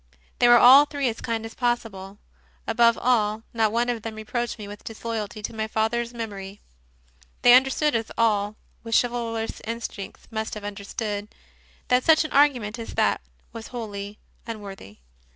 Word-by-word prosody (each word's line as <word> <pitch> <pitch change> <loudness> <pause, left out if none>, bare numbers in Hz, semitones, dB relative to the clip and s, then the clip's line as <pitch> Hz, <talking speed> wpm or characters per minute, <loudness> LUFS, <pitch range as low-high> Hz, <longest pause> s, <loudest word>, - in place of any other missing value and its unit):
They 240 - +5
were 240 0 +8
all 265 +4 +9
three 285 -2 -2
as 225 - -6
kind 225 -1 -2
as 225 - -8
possible. 215 -6 -2 0.5
Above 235 0 +4
all, 220 -3 +1
not 220 -2 +2
one 235 +2 +1
of 240 -2 -2
them 220 0 -6
reproached 235 +3 -3
me 210 -2 -8
with 205 0 -10
disloyalty 220 -2 -5
to - - -4
my 220 0 -3
father 220 +2 0
s 235 0 -6
mem 230 -3 -5
ory. 195 +1 -9 0.8
They 245 - +8
understood, 270 +4 +4
as 225 -1 -2
all 210 -2 +1 0.3
with 230 0 -2
chivalrous 230 -2 -3
instincts 225 -3 -6
must 220 0 -3
have 210 - -8
understood, 205 +1 -4 0.6
that 250 0 +3
such 320 -1 +5
an - - -6
argu 285 -2 +5
ment 210 +2 -6
as 230 - -7
that - - +2 0.3
was 225 -1 -8
wholly 205 -4 -6 0.3
unworthy. 200 - -8
225 Hz, 170 wpm, -25 LUFS, 210-240 Hz, 0.8 s, all